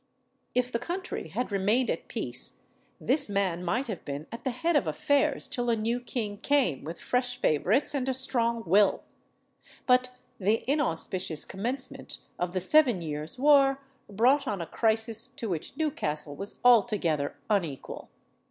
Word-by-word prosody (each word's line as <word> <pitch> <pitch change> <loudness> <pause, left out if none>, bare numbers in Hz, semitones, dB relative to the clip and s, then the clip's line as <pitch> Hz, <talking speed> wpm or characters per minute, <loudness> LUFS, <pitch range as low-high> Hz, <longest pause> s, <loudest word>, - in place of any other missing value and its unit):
If 250 0 +1
the 235 - -1
country 355 +9 -4
had 245 - -3
remained 210 +6 +2
at - - -5
peace, - - -3 0.4
this 275 -2 +2
man 190 -4 0
might 225 +10 0
have 215 -6 -5
been 145 +1 -5
at 230 - -8
the - - 0
head 285 +7 0
of 200 - +2
affairs 275 - +1
till 245 -1 -2
a 230 - +3
new 230 +2 -1
king 220 -5 -4
came 270 - +1
with 165 +3 -7
fresh 250 0 -1
favourites 205 - +2
and 265 -2 -1
a - - +1
strong 235 -3 +2
will; 200 +4 +4 0.8
"but 255 0 +4 0.3
the 210 +3 +1
inauspicious 185 - -1
commencement 245 +7 -4 0.2
of 175 0 -2
the 185 - 0
Seven 250 - +4
Years' 150 +3 -5
War 275 0 +5 0.3
brought 250 +8 +3
on 205 -3 -2
a 170 - -3
crisis 225 +3 0
to 260 -3 -7
which 170 -6 -4
Newcastle 150 - -1
was 195 +7 -5
altogether 205 -12 +3
unequal. 170 -10 -2
230 Hz, 155 wpm, -28 LUFS, 185-255 Hz, 0.8 s, War